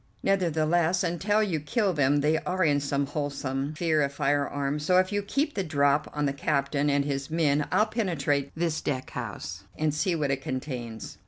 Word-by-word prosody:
Nevertheless, 175 Hz, -1 st, +2 dB
until 195 Hz, +5 st, +1 dB
you 175 Hz, -7 st, -1 dB
kill 195 Hz, -, 0 dB
them 145 Hz, -1 st, +2 dB
they 155 Hz, +2 st, +2 dB
are 185 Hz, +1 st, -1 dB
in 145 Hz, -3 st, +3 dB
some 140 Hz, 0 st, 0 dB
wholesome 140 Hz, 0 st, -3 dB
fear 160 Hz, -2 st, +1 dB
of 140 Hz, -1 st, +1 dB
firearms, 145 Hz, +1 st, 0 dB
so 180 Hz, +4 st, +3 dB
if 185 Hz, +1 st, +3 dB
you 205 Hz, 0 st, 0 dB
keep 280 Hz, +9 st, -1 dB
the 195 Hz, -, -1 dB
drop 145 Hz, -3 st, +2 dB
on 150 Hz, 0 st, -1 dB
the 140 Hz, -, 0 dB
captain 140 Hz, 0 st, 0 dB
and 140 Hz, 0 st, +2 dB
his 135 Hz, -1 st, -3 dB
men 150 Hz, -3 st, +1 dB
I'll 210 Hz, +4 st, +4 dB
penetrate 165 Hz, -, -1 dB
this 165 Hz, -1 st, -1 dB
deck 130 Hz, -3 st, -3 dB
house 90 Hz, +5 st, -6 dB
and 155 Hz, -1 st, +1 dB
see 170 Hz, +4 st, 0 dB
what 145 Hz, -4 st, 0 dB
it 135 Hz, -1 st, -1 dB
contains." 125 Hz, -4 st, -5 dB
150 Hz, 185 wpm, -27 LUFS, 140-175 Hz, -, I'll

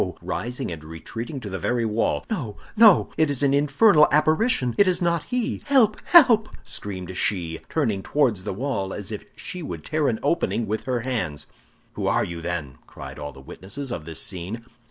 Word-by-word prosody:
rising 120 Hz, -5 st, -3 dB
and 80 Hz, -2 st, -7 dB
retreating 115 Hz, -, -7 dB
to 110 Hz, -, -8 dB
the 95 Hz, -1 st, -4 dB
very 120 Hz, +6 st, 0 dB
wall. 110 Hz, +1 st, 0 dB
"No, 130 Hz, -, -4 dB, 0.2 s
no! 215 Hz, -4 st, +6 dB
it 155 Hz, -2 st, +4 dB
is 145 Hz, -1 st, 0 dB
an 140 Hz, -1 st, +3 dB
infernal 150 Hz, +4 st, +5 dB
apparition! 155 Hz, -, +2 dB
It 200 Hz, -, +4 dB
is 180 Hz, -1 st, +3 dB
not 170 Hz, -3 st, 0 dB
he! 250 Hz, -2 st, -2 dB
Help, 255 Hz, -7 st, +3 dB
help!" 245 Hz, -11 st, +6 dB
screamed 95 Hz, -2 st, -6 dB
she, 85 Hz, -5 st, -1 dB
turning 115 Hz, -11 st, 0 dB
towards 120 Hz, -7 st, +1 dB
the -, -, -3 dB
wall, 100 Hz, -3 st, -3 dB
as 100 Hz, +1 st, -6 dB
if 105 Hz, -, -6 dB
she 185 Hz, -5 st, -6 dB
would 155 Hz, -, -7 dB
tear 155 Hz, -2 st, 0 dB
an 110 Hz, -, +1 dB
opening 145 Hz, -6 st, 0 dB
with 110 Hz, +1 st, -3 dB
her 125 Hz, -2 st, -1 dB
hands. 100 Hz, -, -3 dB, 0.5 s
"Who -, -, -3 dB
are -, -, +2 dB
you, 85 Hz, -1 st, -5 dB
then?" 80 Hz, -7 st, -4 dB
cried -, -, -10 dB
all 75 Hz, 0 st, -5 dB
the 65 Hz, -, -14 dB
witnesses 110 Hz, -, -6 dB
of 80 Hz, -, -5 dB
this 80 Hz, -1 st, -6 dB
scene. 100 Hz, +5 st, -4 dB
120 Hz, 190 wpm, -24 LUFS, 95-155 Hz, 0.5 s, no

